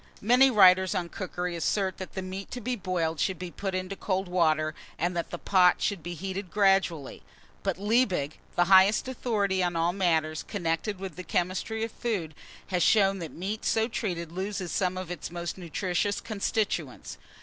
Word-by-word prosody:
MANY 250 +5 +5
WRITERS 190 -4 +6
ON 175 -2 -2
COOKERY 180 -2 -4
assert 190 +3 -1
that 185 - -7
the 190 - -4
meat 190 +1 -6
to 250 - -5
be 245 +2 -2
boiled 175 -6 -2
should 190 +3 0
be 180 0 -6
put 195 0 -4
into 185 +1 -3
cold 190 -1 -2
water, 155 -3 +2 0.2
and 175 +1 -1
that 170 - -2
the 175 - -5
pot 180 0 +4
should 200 -5 -1
be 175 +2 -6
heated 190 +2 -5
gradually; 195 -8 +1 0.4
but - - -1
Liebig, 200 - +1 0.2
the 175 - +4
highest 190 +5 +5
authority 210 -7 0
on 175 -1 0
all 165 +1 +1
matters 160 -5 +1
connected 190 +1 -2
with 185 -4 -7
the 185 - -6
chemistry 185 +6 -1
of 225 - -3
food, 200 -12 -3 0.4
has 180 -2 0
shown 195 +1 +4
that 165 -3 -5
meat 200 +5 -4
so 225 0 +2
treated 175 -8 -3
loses 190 0 -4
some 185 -2 0
of 185 -1 -5
its 175 - -5
most 175 0 -4
nutritious 185 +3 -1
constituents. 175 - -2
185 Hz, 180 wpm, -28 LUFS, 175-200 Hz, 0.4 s, WRITERS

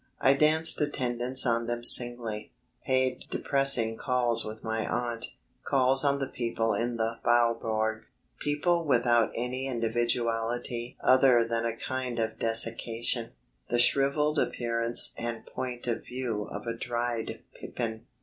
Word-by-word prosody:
I 135 - +4
danced 155 +3 +3
attendance 130 -3 +2
on 115 -1 0
them 120 0 -4
singly; 120 -4 +3 0.4
paid 130 -1 0
depressing 135 -5 +4
calls 125 -3 +1
with 110 +1 -8
my 110 0 -2
aunt; 120 -1 -3 0.4
calls 135 -1 +4
on 140 -1 +1
the 135 - -3
people 115 -3 -2
in 115 +3 -3
the 115 0 -3
Faubourg; 115 -2 0 0.3
people 165 +4 0
without 120 -5 +2
any 125 +3 -4
individuality 120 0 -2
other 130 -3 +4
than 115 0 -2
a 115 0 -5
kind 130 -1 -5
of 110 -1 -3
desiccation, 115 +1 0 0.4
the 120 - 0
shrivelled 140 +4 +2
appearance 115 0 +3
and 115 -1 -5
point 125 -2 -5
of 120 -2 -3
view 120 -5 -4
of - - -8
a 115 - -3
dried 120 -1 -4 0.2
pippin. 110 -2 -6
120 Hz, 130 wpm, -27 LUFS, 115-130 Hz, 0.4 s, I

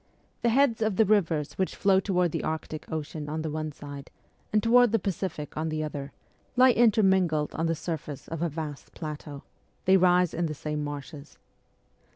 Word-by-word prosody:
The 235 - +3
heads 235 -2 +3
of 215 -3 +1
the 220 - +4
rivers 165 -9 +1
which 190 - 0
flow 195 -1 +4
toward 180 -3 +1
the - - -3
Arctic 155 0 -4
Ocean 155 -1 -4
on 155 +1 -3
the 160 - -3
one 155 0 -3
side, 145 -1 -9 0.4
and 210 0 +2
toward 240 0 +5
the - - +5
Pacific 185 -6 -4
on 160 +1 -2
the 155 0 -2
other, 145 -2 -5 0.4
lie 255 0 +7
intermingled 190 -9 +3
on 165 +1 -1
the 165 - +1
surface 155 -4 -5
of 165 -1 -5
a 170 - +1
vast 150 -2 -7
plateau; 150 -2 -7 0.4
they 190 +1 +6
rise 180 -1 +4
in 170 0 0
the 155 - -4
same 150 +1 -3
marshes. 145 0 -7
160 Hz, 185 wpm, -27 LUFS, 150-195 Hz, 0.4 s, lie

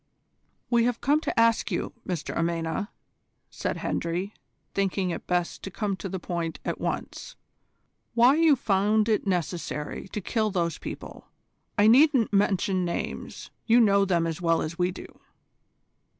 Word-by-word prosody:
"We 235 -1 +4
have 245 -1 0
come 295 +2 +2
to - - -1
ask 230 0 +3
you, - - -3
Mr 175 -5 -3
Amena," 170 +3 -1 0.6
said - - -3
Hendry, 175 +5 -2 0.4
thinking 195 -2 0
it - - -6
best 175 -1 -1
to - - -6
come 200 +1 -2
to 190 +2 -6
the 190 - -3
point 170 -2 -3
at - - -3
once, - - -4 0.8
"why 240 +3 +6
you 320 -1 +5
found 210 -1 +2
it 215 -2 +1
necessary 175 -3 -3
to 210 - -5
kill 215 +2 0
those 170 -4 -1
people. - - -8 0.5
I 205 - +5
needn't 250 -1 +5
mention 195 -2 +2
names. 170 -1 -5 0.2
You 235 +1 +6
know 200 -3 +5
them 175 -4 +1
as 165 +1 -3
well 165 -1 +2
as 160 +2 -4
we 180 0 +2
do." 185 - -8
195 Hz, 150 wpm, -26 LUFS, 175-225 Hz, 0.8 s, why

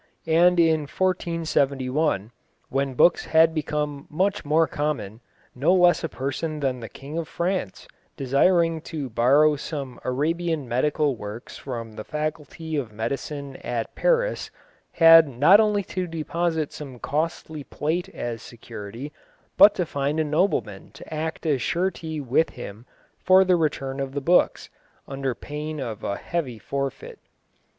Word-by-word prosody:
And 170 +2 +4
in 160 -3 +3
1471, 150 - 0 0.4
when 135 0 -1
books 175 - +4
had 160 0 +4
become 150 -2 -3
much 190 +6 0
more 155 +2 +3
common, 140 -9 -3 0.3
no 155 +9 +2
less 175 -1 +4
a 165 - -2
person 140 +4 -3
than 130 -3 -1
the 115 -2 -8
King 145 +9 -7
of 165 - -4
France, 170 - -3 0.3
desiring 165 +5 +2
to 150 -6 -6
borrow 140 +7 +4
some 140 -3 -6
Arabian 160 +2 -1
medical 140 +3 +1
works 105 +1 -8
from 115 -4 -6
the 110 - -7
Faculty 155 +2 -4
of 125 -6 -3
Medicine 135 +5 -4
at 115 -2 -4
Paris, - - +1 0.4
had 165 -1 +8
not 145 - +5
only 210 -2 +2
to 185 -1 -4
deposit 165 -1 -2
some 135 -4 -8
costly 155 +2 -3
plate 170 +7 -2
as 120 - -5
security, 115 +4 -9 0.4
but 205 0 +8
to 180 - 0
find 145 +1 -2
a - - +3
nobleman 150 - -1
to - - -11
act 160 +2 -4
as 145 -5 +1
surety 170 -2 -2
with 140 +4 +1
him 115 -1 -10 0.3
for 185 +1 +6
the 180 -1 +4
return 145 -4 -1
of 135 -1 -3
the 140 - -1
books, 175 +6 +2 0.4
under 135 -2 -3
pain 150 +3 -6
of 115 -6 -5
a 100 - -2
heavy 150 -9 -3
forfeit. 140 - -5
150 Hz, 145 wpm, -24 LUFS, 135-165 Hz, 0.4 s, had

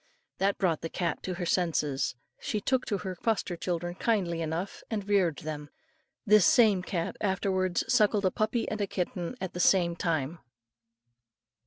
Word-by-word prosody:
That 195 +1 +2
brought 170 -5 +1
the 165 - -4
cat 170 -3 -2
to 185 - -4
her 175 0 -3
senses; 155 -8 0 0.2
and - - -22
she 210 - -1
took 255 +4 0
to 205 - 0
her 185 0 -5
foster 190 -1 -1
children 175 0 -3
kindly 180 -5 0
enough 165 +4 -3
and 205 -3 -3
reared 190 -6 +3
them. 150 -2 -6 0.6
This 210 -3 +6
same 215 -6 +5
cat 175 -2 -3
afterwards 190 -2 0
suckled 210 -4 +3
a 185 - +3
puppy 220 +4 0
and 215 - -3
kitten 180 +3 -3
at 190 -3 -4
the 180 - -5
same 175 -2 +4
time. 165 -2 -1
185 Hz, 165 wpm, -29 LUFS, 170-205 Hz, 0.6 s, This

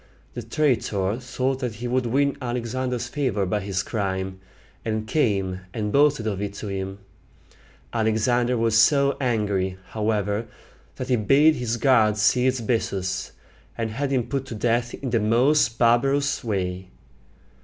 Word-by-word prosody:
The 120 - -5
traitor 115 -5 0
thought 130 +1 -2
that 125 -5 -3
he 120 +4 -5
would 125 0 0
win 140 +4 +1
Alexander's 125 0 -2
favor 120 -8 -1
by 95 +3 0
this 100 -1 -2
crime, 95 -3 -3 0.4
and 110 -1 -2
came 100 -8 0 0.2
and 105 -2 -2
boasted 145 -2 +3
of 100 -3 -2
it 100 -1 -4
to 105 0 -6
him. 95 0 -4 1.0
Alexander 120 +3 +1
was 115 -1 +1
so 140 +5 +4
angry, 100 -7 0
however, 105 0 -1 0.5
that 130 0 -6
he 125 - +3
bade 140 +8 +5
his 120 -4 -2
guards 110 -5 +3
seize 125 +3 +2
Bessus, 95 -5 -2 0.4
and 115 -1 -2
had 135 +5 -2
him 130 -3 +1
put 135 0 -3
to 120 - -6
death 120 +2 0
in 130 -3 -5
the 115 - +2
most 115 +3 +3
barbarous 135 +4 +2
way. 95 -4 -2
115 Hz, 145 wpm, -24 LUFS, 105-130 Hz, 1.0 s, bade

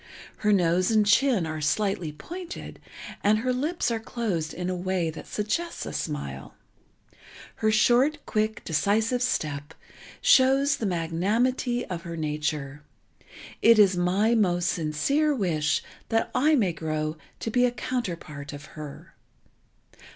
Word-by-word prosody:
Her 210 - +1
nose 180 -2 +3
and 215 -2 +3
chin 230 -3 +3
are 155 -1 -4
slightly 180 +1 0
pointed 350 - -8 0.4
and 210 +1 +4
her 255 +3 0
lips 295 +2 -1
are 230 - -1
closed 210 -9 -3
in 180 +1 -4
a 185 - -1
way 180 -2 -1
that 160 - -10
suggests 215 +12 -2
a - - -6
smile. 70 - -5 1.0
Her 215 - +2
short, 245 +7 +4
quick, 215 +1 -1
decisive 215 - +1
step 150 - -2 0.4
shows 275 +1 +4
the 220 - -2
magnanimity 210 +9 0
of 180 -3 -5
her 170 0 -7
nature. 150 -2 -3 0.8
It 230 0 +7
is 195 -3 +6
my 190 +6 +2
most 180 -5 +2
sincere 275 - +1
wish 160 - 0 0.3
that 225 0 0
I 305 +4 +4
may 200 -10 +2
grow 155 -1 -3 0.3
to 225 - -3
be 245 +2 +4
a - - +3
counterpart 170 - -4
of 145 0 -9
her. 150 -2 -9
195 Hz, 135 wpm, -26 LUFS, 160-240 Hz, 1.0 s, It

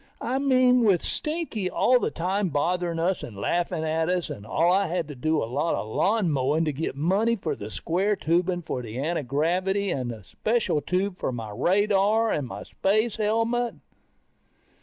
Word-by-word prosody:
I 255 +3 -1
mean 255 -2 +4
with 195 -6 +3
Stinky 300 - -2
all 250 +6 +3
the - - 0
time 190 +3 -1
bothering 170 +3 0
us 175 +3 0
and 105 -5 -8
laughing 165 - -1
at 160 +1 0
us. 180 -1 -1
And 100 +1 -8
I 180 - +2
had 165 -2 -2
to 145 - -7
do 155 +4 0
a - - -1
lot 140 +8 -1
of - - -4
lawn 195 - +1
mowing 145 +4 +1
to 150 - -1
get 145 0 -3
money 195 +10 +2
for 205 - -3
the 105 - -7
square 180 - 0
tubing 175 +1 0
for 130 -5 -3
the 115 -1 -7
antigravity 170 +7 0
and 130 -5 -2
the 110 -4 -7
special 215 - 0
tube 185 +4 -1
for - - -1
the 115 -4 -6
radar, 205 - +2
and 145 -4 -1
my - - -7
space 215 +4 0
helmet. 230 +1 0
180 Hz, 180 wpm, -26 LUFS, 150-210 Hz, -, mean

